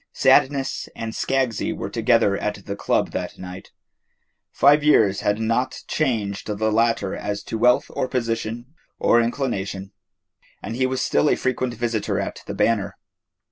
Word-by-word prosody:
Sadness 135 -1 +2
and 115 -1 -5
Skaggsy 130 -3 0
were - - -5
together 100 - +3
at 105 -1 -4
the 100 - -4
club - - 0
that - - -4
night. 90 0 -9 0.8
Five 145 +3 +4
years 105 -10 +4
had 105 0 0
not 115 +3 -1
changed 110 -9 -1
the 110 +1 -1
latter 115 -3 +1
as 105 0 -4
to 110 - -5
wealth 125 +2 +4
or - - -2
position 115 +1 -3 0.2
or 120 - +4
inclination, 100 -6 -3 0.7
and 115 - -6
he 130 +1 +1
was 130 0 -1
still 150 - +2
a - - +3
frequent 130 -1 -2
visitor 115 -2 -1
at - - -4
the - - -5
Banner. 105 -2 0
115 Hz, 150 wpm, -22 LUFS, 105-130 Hz, 0.8 s, Five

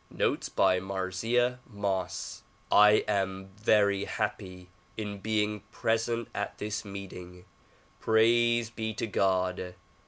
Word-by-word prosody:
Notes - - -1
by 95 -1 +3
Marzieh 100 +7 0
Moss 95 -3 -3 0.3
I 105 +1 +6
AM 95 -2 -1
very 100 -2 +3
happy 95 -4 -4 0.3
in 105 -2 -4
being 105 0 0
present 115 +1 0
at - - -4
this 105 0 -3
meeting. 90 -3 -9 0.8
Praise 120 0 +3
be 110 -2 -4
to 110 - -2
God 95 -3 0
100 Hz, 105 wpm, -29 LUFS, 95-110 Hz, 0.8 s, I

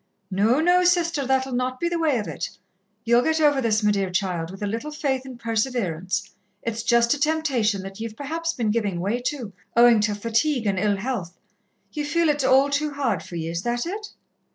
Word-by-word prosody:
No, 215 +8 +3
no, 355 +3 +4
Sister, 335 -6 +2
that'll 265 0 +1
not 255 +1 -1
be 345 - 0
the 340 0 -1
way 305 -5 +2
of 210 -5 -3
it. 150 -5 -4 0.6
Ye'll 235 +1 +5
get 320 +4 +1
over 290 -3 +4
this, 220 -2 +1
me 210 - +4
dear 195 -2 0
child, 180 -3 -1
with 195 +2 -8
a - - +1
little 225 +8 -3
faith 275 -3 -2
and 255 -2 -9
perseverance. 210 -6 -2 0.3
It's 230 -1 -2
just 235 +1 +3
a 295 - -4
temptation, 275 -10 +1
that 195 +1 -9
ye've 225 -1 -5
perhaps 330 +4 -2
been 225 -7 -1
giving 205 -6 -1
way 205 +7 -1
to, 245 -9 -4 0.2
owing 235 -1 +7
to 210 0 +1
fatigue 230 +4 0
and 195 -2 +1
ill 205 0 +1
health. 195 -6 -4 0.5
Ye 300 - -3
feel 330 +2 +1
it's 295 -1 +1
all 265 +2 +4
too 295 +2 0
hard 230 - 0
for 175 - -10
ye, 165 -1 -3
is 170 0 -3
that 240 - -1
it?" 420 +5 -5
240 Hz, 210 wpm, -24 LUFS, 205-290 Hz, 0.6 s, owing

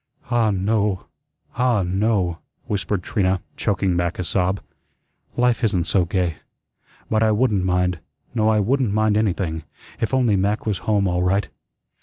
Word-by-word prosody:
"Ah, 120 -2 +3
no; 100 0 0 0.5
ah, 125 -5 +2
no," 95 -2 0 0.3
whispered 100 -1 -2
Trina, 95 -1 +1 0.2
choking 95 -3 0
back 85 0 -1
a 90 - -2
sob. 90 +3 0 0.8
"Life 125 0 +2
isn't 100 -6 +2
so 90 +1 +2
gay. 90 -3 -1 0.7
But 110 0 +1
I 110 - +4
wouldn't 105 -3 +2
mind, 90 -1 +1 0.3
no 110 -2 +2
I 110 -1 +3
wouldn't 125 +1 +1
mind 110 0 +2
anything, 95 -6 0 0.4
if 110 - -1
only 125 -5 +3
Mac 100 +3 0
was 105 -4 -1
home 100 -2 +3
all 90 0 0
right." 95 +3 +1
100 Hz, 150 wpm, -22 LUFS, 90-110 Hz, 0.8 s, I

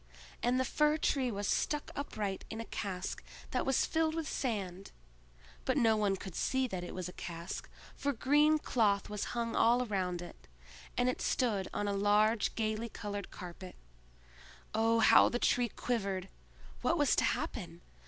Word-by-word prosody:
And 245 +2 +2
the 260 - +2
Fir 300 +3 +2
tree 270 -4 +1
was 205 -2 -3
stuck 295 -1 0
upright 210 -8 -3
in 220 - -5
a 230 - -4
cask 190 -4 -4 0.3
that - - 0
was 270 - +3
filled 320 -1 +1
with 325 -2 -2
sand: 195 -7 -3 0.7
but - - +1
no 225 -1 +4
one 205 -2 +2
could 190 -1 -8
see 260 +8 +1
that 185 -3 -4
it 175 - -7
was 185 -1 -3
a 180 - -8
cask, 170 +1 -6 0.3
for 285 - 0
green 295 +5 +4
cloth 210 -9 +1
was 210 -1 -2
hung 230 -1 -1
all 240 +2 +4
round 180 -5 -2
it, 175 - -12 0.5
and 245 - +3
it 255 - -1
stood 210 -7 +1
on 205 - -2
a 200 - 0
large 210 +2 +3
gayly 220 +1 -1
colored 205 -2 -5
carpet. 180 +1 -9 1.0
Oh, 225 +1 +3
how - - +7
the 240 - -1
Tree 245 0 +2
quivered! 195 -6 -2 0.5
What - - +2
was - - +3
to - - +4
happen? - - -2
215 Hz, 170 wpm, -33 LUFS, 195-250 Hz, 1.0 s, how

